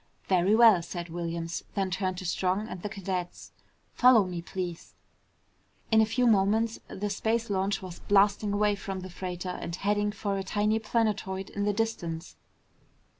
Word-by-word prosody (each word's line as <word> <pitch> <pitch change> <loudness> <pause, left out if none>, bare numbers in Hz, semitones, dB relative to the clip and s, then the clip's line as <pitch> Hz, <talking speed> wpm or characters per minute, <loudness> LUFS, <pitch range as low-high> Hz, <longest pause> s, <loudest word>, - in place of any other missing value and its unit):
"Very 185 +2 +3
well," 220 -6 +7
said 175 0 -6
Williams, 170 0 -4
then 195 -2 0
turned 185 -1 -1
to 185 - -6
Strong 185 +4 0
and 180 - -7
the 210 - -4
cadets. 185 -3 -5 0.4
"Follow 245 -5 +6
me, 175 -2 -4
please." 175 -1 -6 1.0
In 220 0 +6
a 220 - +3
few 250 +3 +1
moments 220 +1 +3
the 205 +2 -4
space 225 +2 -1
launch 195 0 0
was 180 -2 -8
blasting 205 +1 +3
away 205 0 +2
from 195 -2 -5
the 185 0 -8
freighter 180 0 -5
and 170 - -4
heading 205 +2 0
for 200 -2 -2
a - - -3
tiny 210 +3 +1
planetoid 210 -4 -1
in 205 0 -2
the 205 - +1
distance. 180 -7 -3
195 Hz, 165 wpm, -28 LUFS, 180-210 Hz, 1.0 s, well